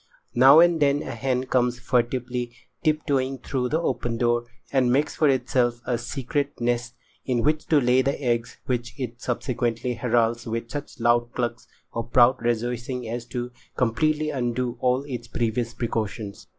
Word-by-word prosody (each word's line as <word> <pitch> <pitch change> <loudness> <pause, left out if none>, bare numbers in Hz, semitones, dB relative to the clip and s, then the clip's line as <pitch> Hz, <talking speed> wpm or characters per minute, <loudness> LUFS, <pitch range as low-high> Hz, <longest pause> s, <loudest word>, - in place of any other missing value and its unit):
Now 135 +5 +8
and 170 -1 +4
then 145 0 +2
a - - -5
hen 125 +2 -1
comes 125 -1 +1
furtively 120 0 -1 0.3
tip 155 -2 +1
toeing 135 -1 0
through 125 -2 -1
the 155 - +1
open 120 -8 -1
door 120 0 +1 0.3
and 130 -2 +3
makes 140 +4 +1
for 150 - +3
itself 125 -2 +1
a 120 -2 0
secret 135 +4 -3
nest 120 0 -1 0.3
in 125 -3 0
which 155 +1 +1
to 155 - +5
lay 125 0 +4
the 140 +2 -1
eggs 120 -3 -1
which 120 0 -3
it 120 -1 -5
subsequently 120 -1 -1
heralds 115 -1 +1
with 115 +1 -4
such 145 -2 -6
loud 120 0 +2
clucks 120 -1 -3 0.3
of 115 0 -4
proud 125 +1 +5
rejoicing 120 +1 -2
as 120 +1 -5
to 120 0 -4 0.3
completely 150 +6 +1
undo 125 -2 -1
all 125 +2 +2
its 125 -4 -6
previous 120 0 -1
precautions. 110 -3 -3
125 Hz, 165 wpm, -25 LUFS, 120-130 Hz, 0.3 s, Now